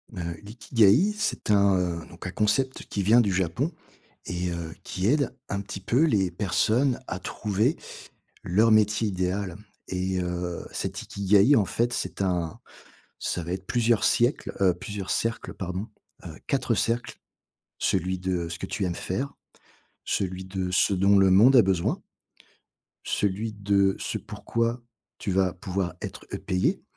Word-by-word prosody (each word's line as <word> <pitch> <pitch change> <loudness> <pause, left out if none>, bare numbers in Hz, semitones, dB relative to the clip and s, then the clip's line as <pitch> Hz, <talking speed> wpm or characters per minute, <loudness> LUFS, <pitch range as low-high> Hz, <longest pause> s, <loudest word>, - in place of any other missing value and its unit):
Heu, 85 -2 -5
«l'Ikigai» 115 - +3
c'est 210 - -1
un, 100 -2 +4
heu, 85 -3 -2
donc - - -11
un - - -4
concept 130 +5 0
qui 100 - -2
vient 115 +5 +6
du 105 -4 +1
Japon, 95 - 0 0.5
et 90 0 -2
heu, 85 -2 -5
qui 95 +2 -2
aide 140 +1 +2
un 100 0 -2
petit 95 -1 -7
peu 125 +9 +2
les 100 - +2
personnes 110 +6 +1
à 95 - -4
trouver 105 - 0 0.7
leur 110 +6 +3
métier 110 0 +3
idéal, 95 -1 -2 0.3
et 95 0 -1
heu, 90 -1 -3
cet - - -3 0.2
«Ikagai» 100 +7 +5
en 105 - +4
fait 120 +5 0
c'est - - -3
un 90 -4 -1 0.6
ça 90 - -2
va 85 - -5
être 95 +1 -4
plusieurs 120 -2 +2
siècles, 120 +4 +2
heu, 90 -2 +5
plusieurs 100 +2 -6
cercles 115 0 -1
pardon. 95 +3 -4 0.4
Heu, 80 -2 -8
4 130 -3 +1
cercles. 115 +3 -1 0.6
Celui 95 0 0
de 90 -2 -2
ce 85 - -6
que - - -3
tu 100 - -3
aimes 90 -2 -1
faire. 135 +10 -3 0.7
Celui 95 -1 -2
de 95 -1 -3
ce 100 +2 +3
dont 100 +2 +4
le 95 -1 +5
monde 120 +8 +7
à 120 - +8
besoin 95 -3 0 1.1
celui 105 +2 -1
de 100 -1 +2
ce - - -3
pourquoi, 115 +1 -2 0.4
tu 100 - -3
vas 95 -1 +2
pouvoir 90 0 -3
être, - - -7
heu, - - -1
payé, 90 0 0
95 Hz, 160 wpm, -26 LUFS, 90-115 Hz, 1.1 s, à